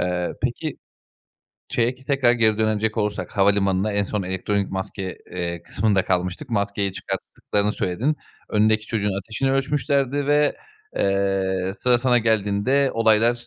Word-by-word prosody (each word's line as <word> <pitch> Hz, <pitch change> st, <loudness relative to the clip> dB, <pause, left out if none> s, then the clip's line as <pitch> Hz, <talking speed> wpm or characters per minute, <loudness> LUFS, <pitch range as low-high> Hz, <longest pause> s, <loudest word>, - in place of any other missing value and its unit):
Eee, 90 Hz, 0 st, -1 dB
peki, -, -, -2 dB, 0.9 s
şeye 120 Hz, +1 st, +1 dB
ki 130 Hz, +1 st, -20 dB
tekrar 135 Hz, -4 st, +3 dB
geri 110 Hz, -3 st, +2 dB
dönecek 110 Hz, 0 st, +1 dB
olursak, 105 Hz, -1 st, -2 dB
havalimanına, 100 Hz, 0 st, +2 dB
en 100 Hz, -, +1 dB
son 100 Hz, 0 st, -2 dB
elektronik 95 Hz, +2 st, -1 dB
maske, 95 Hz, -1 st, -4 dB
eee, 85 Hz, -1 st, -4 dB
kısmında 100 Hz, -2 st, +1 dB
kalmıştık. 90 Hz, +8 st, -1 dB
Maskeyi 100 Hz, -2 st, 0 dB
çıkarttıklarını 100 Hz, +2 st, -2 dB
söyledin. 110 Hz, +11 st, -1 dB, 0.3 s
Önündeki 110 Hz, 0 st, +2 dB
çocuğun 105 Hz, -3 st, -1 dB
ateşini 115 Hz, +7 st, -1 dB
ölçmüşlerdi 140 Hz, 0 st, 0 dB
ve, 145 Hz, 0 st, +3 dB, 0.4 s
eee, 95 Hz, -1 st, 0 dB
sıra 125 Hz, 0 st, +3 dB
sana 125 Hz, 0 st, +3 dB
geldiğinde 110 Hz, +5 st, +2 dB
olaylar 115 Hz, +1 st, +3 dB
105 Hz, 130 wpm, -23 LUFS, 95-120 Hz, 0.9 s, tekrar